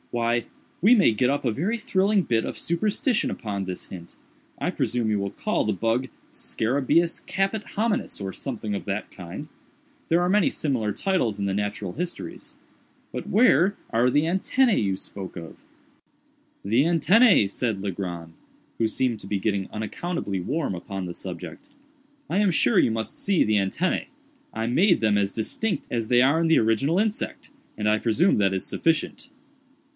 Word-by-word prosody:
Why, 120 0 0 0.4
we 210 +7 +7
may 195 - +5
get 125 +4 +2
up 140 0 -1
a 120 - +2
very 185 - -1
thrilling 200 -1 +2
bit 115 -6 +1
of - - -5
superstition 215 - 0
upon 100 -3 -4
this 95 -1 -5
hint. 85 -2 -11 0.4
I - - -1
presume 120 -3 -1
you 105 - +1
will 100 0 -2
call 210 - -1
the 110 - 0
bug 115 +6 0 0.2
scarabæus 140 +8 0
caput 195 +2 -1
hominis, 220 +1 -1
or 95 -1 -4
something 110 -6 -4
of - - -4
that 100 0 -3
kind—there 280 - -5
are 175 - +1
many 200 +1 +3
similar 125 -8 -1
titles 120 - 0
in 100 - -1
the 100 - 0
Natural 105 -2 -3
Histories. 175 +2 -6 0.6
But - - -5
where 205 -4 +4
are 120 +2 +3
the 145 +4 +3
antennæ 195 +8 +2
you 95 -2 0
spoke 95 -1 -7
of?" 85 -1 -10 1.0
"The 115 +7 +3
antennæ!" 175 - +5
said 110 -1 -2
Legrand, 85 -4 -5 0.5
who 115 - +3
seemed 120 0 -1
to - - -9
be 100 - -1
getting 100 -1 -1
unaccountably 110 - -3
warm 145 - -2
upon 95 +2 -5
the 90 - -5
subject; 95 - -8 0.6
"I 190 - +1
am 205 -3 +3
sure 120 -7 +3
you - - +3
must 110 0 -3
see 200 -3 +2
the 110 - +1
antennæ. 105 - 0 0.4
I 110 - -3
made 175 - +4
them 105 -2 +2
as 100 -1 +1
distinct 155 - -2
as 115 -2 -1
they 125 +1 +5
are 145 +5 +3
in 165 - +2
the 160 - +5
original 115 - +2
insect, 215 0 -2 0.3
and 105 0 -1
I 110 0 +3
presume 130 - +2
that 100 -1 +3
is 95 0 -2
sufficient." 165 - -1
120 Hz, 170 wpm, -25 LUFS, -, 1.0 s, we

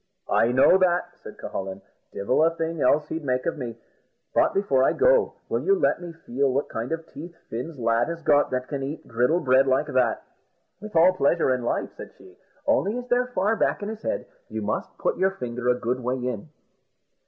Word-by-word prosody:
"I 115 - +3
know 135 +9 +5
that," 180 -1 +2
says - - -10
Cucullin; 95 0 -5 0.3
"divil 125 +10 +1
a 165 - +5
thing 165 -1 -3
else 150 +1 +3
he'd 160 0 -4
make 130 -2 -1
of - - -1
me; 120 -3 -5 0.6
but - - +3
before 140 -10 +2
I - - +3
go, - - +3
will - - -1
you 395 0 +2
let 345 - +1
me 175 -1 -7
feel 140 -4 -1
what 140 +3 -1
kind 115 +5 -4
of 165 0 -3
teeth 170 +3 -10
Fin's 130 +7 -5
lad 115 -1 +1
has 170 -1 -5
got 145 -2 +4
that 130 0 -2
can 140 -2 -4
eat 140 +4 -6
griddle 125 +9 +1
bread 130 -1 +4
like 135 +3 +2
that?" 130 -6 +1 0.6
"With 215 -2 -10
all 170 +3 +6
pleasure 160 -4 +2
in 125 - -2
life," 120 - -2
said - - -10
she; - - -17 0.3
"only, 205 +5 +1
as 250 0 -6
they're 245 +1 +2
far 220 -2 0
back 210 - 0
in 205 - -3
his 220 0 -7
head, - - -2 0.2
you - - -4
must - - -3
put - - -1
your 190 0 +1
finger 125 0 -3
a 125 - +4
good 125 +2 -1
way 125 +1 -1
in." 125 -4 -4
145 Hz, 210 wpm, -25 LUFS, 125-180 Hz, 0.6 s, all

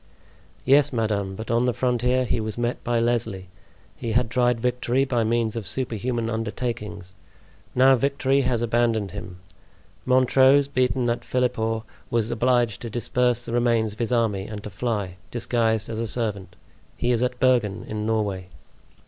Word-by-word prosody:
"Yes, 140 +2 +5
madame; 105 -5 -1
but 110 +3 -5
on 120 +1 +2
the 125 - 0
frontier 125 0 +1
he 120 - 0
was 110 0 -4
met 120 +1 -2
by 120 -1 +1
Lesly; 110 -5 -1 0.5
he 115 -2 -4
had 120 -1 +1
tried 125 -1 +2
victory 125 +2 +1
by 120 -4 0
means 115 0 0
of 115 -4 -4
superhuman 120 -2 -2
undertakings. 105 -4 -4 0.6
Now 130 +1 +6
victory 140 +1 +1
has 120 -3 0
abandoned 115 -3 +1
him. 100 -3 -8 0.7
Montrose, 130 +2 +5
beaten 130 -2 +1
at 120 - -3
Philiphaugh, 115 -3 -1 0.3
was 115 -1 0
obliged 120 -2 +1
to 115 - -5
disperse 120 +1 0
the 115 - -5
remains 115 -3 +2
of 110 - -17
his 115 0 -1
army 110 -5 +1
and 105 -2 -7
to 105 - -7
fly, 100 -3 -3
disguised 115 -3 0
as 115 -1 -4
a 115 - -2
servant. 100 -6 -3 0.4
He 120 - +1
is 120 -1 +1
at 125 0 -1
Bergen, 120 -6 +2
in 105 -1 -4
Norway." 100 -4 -1
115 Hz, 160 wpm, -24 LUFS, 110-125 Hz, 0.7 s, Now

